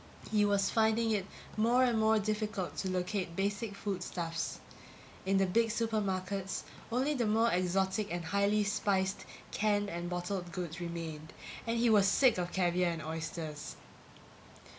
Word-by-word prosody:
He 210 Hz, -1 st, +4 dB
was 200 Hz, -1 st, +2 dB
finding 225 Hz, 0 st, +3 dB
it 200 Hz, -3 st, 0 dB, 0.3 s
more 235 Hz, +4 st, +4 dB
and 240 Hz, -3 st, +3 dB
more 220 Hz, 0 st, +4 dB
difficult 210 Hz, -2 st, -2 dB
to 190 Hz, -, -1 dB
locate 180 Hz, -1 st, -2 dB
basic 200 Hz, +2 st, -1 dB
food 200 Hz, -2 st, -3 dB
stuffs. 165 Hz, -2 st, -3 dB, 0.7 s
In 195 Hz, 0 st, +3 dB
the 195 Hz, -, +4 dB
big 225 Hz, +5 st, +3 dB
supermarkets 200 Hz, -4 st, -1 dB, 0.3 s
only 260 Hz, +5 st, +1 dB
the 240 Hz, -6 st, 0 dB
more 225 Hz, +2 st, +3 dB
exotic 190 Hz, +3 st, +1 dB
and 175 Hz, -1 st, -3 dB
highly 200 Hz, +3 st, +2 dB
spiced 200 Hz, -2 st, 0 dB, 0.3 s
canned 205 Hz, -1 st, +1 dB
and 175 Hz, +1 st, -4 dB
bottled 180 Hz, 0 st, -3 dB
goods 175 Hz, -1 st, -5 dB
remained 165 Hz, -2 st, -5 dB, 0.3 s
and 230 Hz, +1 st, +1 dB
he 230 Hz, 0 st, +4 dB
was 205 Hz, -3 st, +6 dB
sick 240 Hz, +1 st, +4 dB
of 175 Hz, 0 st, -2 dB
caviar 180 Hz, -1 st, +2 dB
and 165 Hz, -2 st, -4 dB
oysters! 160 Hz, -1 st, -5 dB
195 Hz, 150 wpm, -33 LUFS, 180-215 Hz, 0.7 s, was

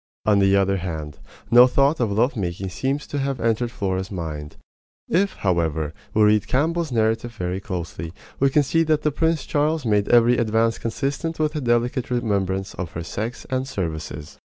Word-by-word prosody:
On 105 Hz, -2 st, +4 dB
the 100 Hz, 0 st, +4 dB
other 100 Hz, 0 st, +2 dB
hand, 80 Hz, -6 st, -5 dB, 0.3 s
no 120 Hz, +1 st, +9 dB
thought 140 Hz, +4 st, +2 dB
of 115 Hz, -4 st, +1 dB
love 115 Hz, +6 st, +1 dB
making 95 Hz, -2 st, -3 dB
seems 135 Hz, +9 st, -2 dB
to 145 Hz, -, -4 dB
have 135 Hz, -2 st, -2 dB
entered 115 Hz, +1 st, 0 dB
Flora's 95 Hz, -3 st, -2 dB
mind. 80 Hz, -5 st, -6 dB, 0.5 s
If, 195 Hz, +3 st, +1 dB
however, 80 Hz, -5 st, 0 dB, 0.2 s
we 110 Hz, -, +5 dB
read 105 Hz, 0 st, +3 dB
Campbell's 160 Hz, +3 st, 0 dB
narrative 115 Hz, 0 st, 0 dB
very 90 Hz, -1 st, -3 dB
closely 85 Hz, -3 st, -5 dB, 0.3 s
we 135 Hz, -, +4 dB
can 145 Hz, +2 st, +3 dB
see 165 Hz, +4 st, +1 dB
that 155 Hz, -2 st, +1 dB
Prince 160 Hz, -3 st, +1 dB
Charles 150 Hz, 0 st, 0 dB
made 105 Hz, -2 st, +1 dB
every 120 Hz, 0 st, +5 dB
advance 115 Hz, 0 st, +1 dB
consistent 140 Hz, +8 st, -3 dB
with 155 Hz, 0 st, 0 dB
a 150 Hz, -, -1 dB
delicate 120 Hz, +1 st, 0 dB
remembrance 100 Hz, -5 st, -1 dB
of 90 Hz, -3 st, -6 dB
her 85 Hz, -, -4 dB
sex 110 Hz, +8 st, -5 dB
and 130 Hz, 0 st, -1 dB
services. 80 Hz, -, -5 dB
110 Hz, 175 wpm, -23 LUFS, 95-135 Hz, 0.5 s, no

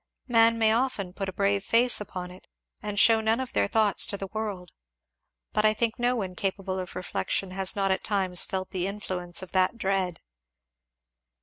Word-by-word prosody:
Men 230 Hz, -1 st, +4 dB
may 220 Hz, -1 st, +3 dB
often 225 Hz, -7 st, -1 dB
put 195 Hz, 0 st, -4 dB
a -, -, -4 dB
brave 200 Hz, +1 st, 0 dB
face 235 Hz, +2 st, +3 dB
upon 180 Hz, -3 st, -6 dB
it 185 Hz, -, -15 dB, 0.3 s
and 205 Hz, -1 st, -2 dB
shew 225 Hz, 0 st, +6 dB
none 220 Hz, +2 st, +1 dB
of 260 Hz, -1 st, -5 dB
their 100 Hz, -, +2 dB
thoughts 215 Hz, -, +3 dB
to 200 Hz, -, -2 dB
the 195 Hz, -, -5 dB
world; 205 Hz, -5 st, -4 dB, 0.8 s
but 210 Hz, -, +2 dB
I 215 Hz, 0 st, +4 dB
think 230 Hz, +1 st, -1 dB
no 245 Hz, +1 st, +2 dB
one 190 Hz, -6 st, -3 dB
capable 190 Hz, 0 st, -3 dB
of 180 Hz, -1 st, -7 dB
reflection 185 Hz, +1 st, -2 dB
has 190 Hz, 0 st, -1 dB
not 195 Hz, -1 st, +1 dB
at 190 Hz, -, -1 dB
times 190 Hz, -3 st, +2 dB
felt 190 Hz, -1 st, -3 dB
the 185 Hz, 0 st, -2 dB
influence 185 Hz, -3 st, -4 dB
of 185 Hz, -, -10 dB
that 185 Hz, +4 st, +1 dB
dread." 190 Hz, -4 st, -1 dB
195 Hz, 190 wpm, -27 LUFS, 185-220 Hz, 0.8 s, shew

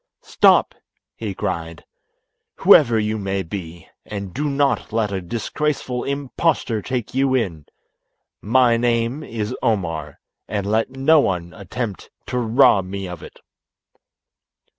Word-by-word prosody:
"Stop!" -, -, +4 dB, 0.4 s
he 105 Hz, -4 st, -5 dB
cried, 80 Hz, -2 st, -4 dB, 0.7 s
"whoever 115 Hz, -1 st, +6 dB
you 110 Hz, 0 st, -1 dB
may 95 Hz, -1 st, -2 dB
be, 85 Hz, -1 st, -8 dB, 0.2 s
and 100 Hz, -3 st, -6 dB
do 150 Hz, +1 st, -1 dB
not 140 Hz, -2 st, 0 dB
let 110 Hz, -2 st, 0 dB
a 95 Hz, -1 st, -2 dB
disgraceful 125 Hz, -, -2 dB
impostor 140 Hz, -4 st, -1 dB
take 125 Hz, 0 st, -4 dB
you 135 Hz, 0 st, +2 dB
in. 85 Hz, -, -2 dB, 0.7 s
My 120 Hz, +2 st, +3 dB
name 120 Hz, +3 st, 0 dB
is 110 Hz, -7 st, -4 dB
Omar, 80 Hz, -9 st, -2 dB, 0.3 s
and 100 Hz, -2 st, -2 dB
let 110 Hz, +4 st, +1 dB
no 135 Hz, +4 st, +4 dB
one 90 Hz, -8 st, -1 dB
attempt 105 Hz, +1 st, -6 dB, 0.2 s
to 125 Hz, -, -2 dB
rob 115 Hz, -4 st, +4 dB
me 95 Hz, 0 st, -5 dB
of 90 Hz, -2 st, -8 dB
it." -, -, -13 dB
110 Hz, 125 wpm, -21 LUFS, 95-125 Hz, 0.7 s, whoever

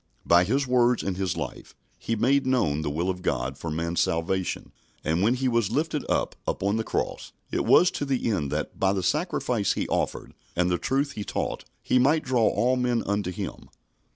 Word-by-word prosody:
By 85 Hz, +1 st, +5 dB
His 135 Hz, +7 st, +1 dB
words 125 Hz, -1 st, +3 dB
and 95 Hz, -, -2 dB
His 95 Hz, -1 st, -2 dB
life, -, -, -6 dB, 0.2 s
He 115 Hz, -, -2 dB
made 130 Hz, +5 st, +2 dB
known 80 Hz, -, +1 dB
the 75 Hz, -, -2 dB
will 80 Hz, +5 st, -1 dB
of 90 Hz, -1 st, -2 dB
God 65 Hz, -5 st, -1 dB
for 85 Hz, -, -6 dB
man's 85 Hz, +2 st, -2 dB
salvation; 85 Hz, +3 st, -1 dB, 0.3 s
and 80 Hz, +3 st, 0 dB
when 115 Hz, +5 st, +3 dB
He 130 Hz, +1 st, -1 dB
was 115 Hz, -4 st, +1 dB
lifted 150 Hz, +4 st, -1 dB
up -, -, 0 dB
upon 100 Hz, +3 st, 0 dB
the 110 Hz, -, 0 dB
cross, -, -, -3 dB, 0.2 s
it -, -, 0 dB
was 180 Hz, +1 st, +6 dB
to 145 Hz, -, -3 dB
the 135 Hz, -3 st, -1 dB
end 75 Hz, -9 st, -1 dB
that, -, -, -3 dB
by 95 Hz, 0 st, +3 dB
the 95 Hz, -2 st, -1 dB
sacrifice 125 Hz, -, 0 dB
He -, -, -2 dB
offered -, -, -2 dB, 0.2 s
and 90 Hz, +1 st, +2 dB
the 90 Hz, -, +1 dB
truth 140 Hz, +2 st, 0 dB
He 105 Hz, -, -5 dB
taught, -, -, -3 dB, 0.2 s
He 125 Hz, -, +3 dB
might 150 Hz, +5 st, +3 dB
draw 125 Hz, -4 st, +2 dB
all 125 Hz, +2 st, +2 dB
men 125 Hz, -2 st, +1 dB
unto 100 Hz, -2 st, -1 dB
Him. 90 Hz, -, -6 dB
110 Hz, 205 wpm, -26 LUFS, 90-130 Hz, 0.3 s, was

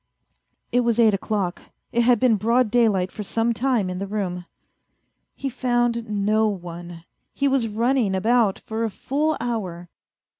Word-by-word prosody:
It 245 Hz, -, +3 dB
was 235 Hz, -2 st, +1 dB
eight 220 Hz, -2 st, +5 dB
o'clock. 195 Hz, -2 st, -2 dB, 0.3 s
It 235 Hz, -, +2 dB
had 240 Hz, -1 st, +4 dB
been 245 Hz, -2 st, +4 dB
broad 230 Hz, +2 st, +2 dB
daylight 210 Hz, -6 st, +2 dB
for 215 Hz, -, -7 dB
some 225 Hz, +3 st, 0 dB
time 240 Hz, -4 st, 0 dB
in 180 Hz, 0 st, -4 dB
the 200 Hz, -, -4 dB
room. 180 Hz, -4 st, -3 dB, 0.9 s
He 275 Hz, -, -4 dB
found 240 Hz, -2 st, 0 dB
no 215 Hz, +1 st, +2 dB
one. 175 Hz, -3 st, -6 dB, 0.3 s
He 280 Hz, -, +1 dB
was 265 Hz, -4 st, +2 dB
running 230 Hz, -1 st, +1 dB
about 220 Hz, 0 st, +2 dB
for 220 Hz, +1 st, -4 dB
a 225 Hz, -, 0 dB
full 295 Hz, +9 st, -1 dB
hour. 185 Hz, -8 st, -4 dB
220 Hz, 155 wpm, -23 LUFS, 195-240 Hz, 0.9 s, eight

